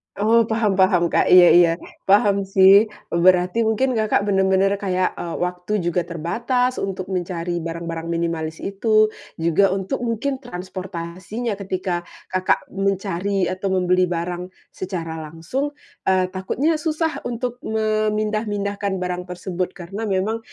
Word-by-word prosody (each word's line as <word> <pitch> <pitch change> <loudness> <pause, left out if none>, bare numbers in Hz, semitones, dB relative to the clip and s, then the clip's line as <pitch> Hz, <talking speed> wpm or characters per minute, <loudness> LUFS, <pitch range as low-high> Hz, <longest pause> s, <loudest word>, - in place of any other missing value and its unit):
Oh, 225 +2 +3
paham 215 -4 0
paham, 180 -3 +3
Kak. - - +3
Iya 180 -1 +8
iya, 175 -1 +6 0.4
paham 200 -1 +3
sih. 195 +2 +6 0.2
Berarti 180 +5 +3
mungkin, 255 +4 +1
Kakak 215 -3 +1
benar-benar 190 -1 +2
kayak, 185 -2 0
eee, 170 -1 -4
waktu 180 +2 -2
juga 175 0 -1
terbatas 240 +10 -1
untuk 190 -1 -4
mencari 175 -1 -2
barang-barang 165 0 -5
minimalis 165 -1 -3
itu. 215 +2 +2 0.2
Juga 170 +4 +2
untuk 190 -1 -3
mungkin 245 +3 -2
transportasinya 185 +1 -6
ketika, 185 -2 -3 0.2
Kakak 185 0 +1
mencari 195 0 -1
atau 190 +1 -3
membeli 180 0 +2
barang 175 +1 -3 0.2
secara 165 -4 -5
langsung, 165 - -4 0.3
eee, 185 -1 +2
takutnya 275 - 0
susah 320 0 -1
untuk 245 +1 -4
memindah-mindahkan 215 -2 -1
barang 180 -1 -3
tersebut 180 0 -4
karena 195 +5 -6
memang, 205 +3 0
190 Hz, 125 wpm, -21 LUFS, 180-215 Hz, 0.4 s, Iya